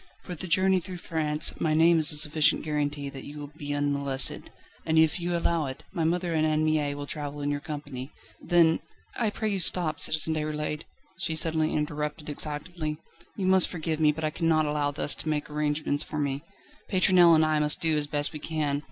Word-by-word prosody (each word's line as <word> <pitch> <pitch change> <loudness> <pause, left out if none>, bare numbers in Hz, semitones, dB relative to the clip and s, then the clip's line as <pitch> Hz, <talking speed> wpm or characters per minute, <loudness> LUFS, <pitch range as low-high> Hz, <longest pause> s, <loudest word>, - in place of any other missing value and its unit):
For 180 - -7
the 175 +2 -6
journey 185 +2 +3
through 180 +1 -8
France, 155 -2 -1
my 155 -1 +1
name 165 +1 +5
is 155 - +6
a 150 - +4
sufficient 150 0 +3
guarantee 145 -2 -2
that 135 -1 -9
you 145 +1 -9
will 145 -1 -8
be 145 -2 -6
unmolested; 140 -2 -1 0.3
and 160 0 0
if 160 +1 +3
you 175 0 -3
will 175 - 0
allow 165 -3 0
it, 130 - -8
my 170 -4 -2
mother 175 +1 0
and 155 -1 +1
Anne 155 0 +1
Mie 150 -2 0
will 145 0 -6
travel 145 -1 -6
in 145 0 -1
your 145 - -2
company. 145 -3 -7 0.3
Then 170 -2 +3 0.2
..." - - -28
"I - - +2
pray 215 +1 -3
you 200 -2 -1
stop, 175 -3 +2
Citizen 160 0 +3
Déroulède," 150 0 -3 0.3
she 170 -3 -2
suddenly 160 0 +1
interrupted 150 0 -3
excitedly. 150 +1 -4 0.4
"You 195 - -3
must 190 -1 +6
forgive 160 -2 -3
me, 155 -1 +4
but 160 +1 -7
I 155 - 0
cannot 160 -1 +1
allow 150 -1 0
thus 145 +1 0
to 160 - -4
make 150 -1 -1
any - - -8
arrangements 150 -1 0
for 155 - -5
me. 140 -1 -2 0.5
Pétronelle 185 -3 +5
and 155 0 +4
I 155 -1 +1
must 150 0 +3
do 160 -1 +2
as 150 -1 0
best 145 +2 0
we 150 - -6
can. 150 -2 -2
155 Hz, 215 wpm, -27 LUFS, 145-165 Hz, 0.5 s, is